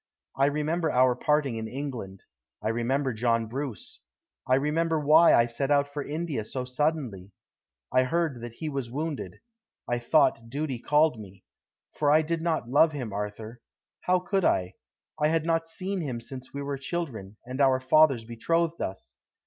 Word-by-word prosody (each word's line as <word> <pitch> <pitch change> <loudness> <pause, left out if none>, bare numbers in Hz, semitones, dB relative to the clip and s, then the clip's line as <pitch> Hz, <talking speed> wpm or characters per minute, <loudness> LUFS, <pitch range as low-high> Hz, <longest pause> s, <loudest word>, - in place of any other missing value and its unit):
I 135 +1 +3
remember 155 +3 0
our 130 -2 +4
parting 145 -5 +1
in 110 0 -4
England; 120 -7 -6 0.4
I 105 - -2
remember 130 +4 0
John 115 0 +1
Bruce; 125 -1 -6 0.5
I 130 - +4
remember 160 +4 +1
why 155 +3 +6
I 115 - +5
set 125 +4 -2
out 145 -1 +3
for 145 +1 -5
India 150 -4 -3
so 125 +4 -4
suddenly. 125 - -2 0.6
I 130 - +5
heard 155 -4 -1
that 120 -1 -7
he 155 +6 -6
was 135 -5 -3
wounded. 150 +3 -5 0.5
I 120 0 0
thought 115 -2 +2
duty 140 -1 -3
called 150 -2 +2
me. 100 -2 -12 0.5
For 145 - +1
I 155 +2 +5
did 165 +1 -2
not 165 -7 -1
love 150 +5 +4
him, 125 -8 -5
Arthur. 105 +3 -6 0.4
How 185 0 +4
could 185 +2 -1
I? 90 - +1 0.5
I 150 - +3
had 160 0 +1
not 165 0 +1
seen 185 +3 -3
him 130 -7 -3
since 130 +2 -9
we 140 0 -5
were 140 -1 -4
children, 130 - -5
and 130 +3 -3
our 135 -1 +4
fathers 130 -2 +4
betrothed 165 +9 -1
us. 95 - -6
140 Hz, 170 wpm, -27 LUFS, 115-155 Hz, 0.6 s, why